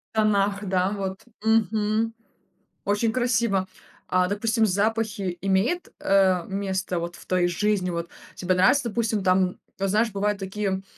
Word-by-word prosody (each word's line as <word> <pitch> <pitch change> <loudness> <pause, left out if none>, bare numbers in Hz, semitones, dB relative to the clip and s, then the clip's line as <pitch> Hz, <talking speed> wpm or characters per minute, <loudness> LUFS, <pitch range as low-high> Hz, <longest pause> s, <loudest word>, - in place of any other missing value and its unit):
Тонах, 205 -1 +2
да, 185 0 +1
вот. 190 -1 -3 0.2
Мгм. 220 0 +1 0.7
Очень 205 +3 +1
красиво! 230 -6 +1 0.4
А, 180 0 +2
допустим, 220 +3 +1
запахи 205 -2 0
имеют, 195 - +1
э, 190 -3 +3
место 190 -2 -2
вот 170 +1 -5
в - - -14
твоей 180 -1 +2
жизни? 190 +1 0
Вот 170 0 -3 0.3
тебе 185 0 0
нравится, 240 +9 +4
допустим, 220 -3 -1
там, 185 0 +2 0.2
вот, 195 0 0
знаешь, 220 +3 +2
бывают 205 0 0
такие, 195 0 -2
200 Hz, 135 wpm, -25 LUFS, 190-220 Hz, 0.7 s, нравится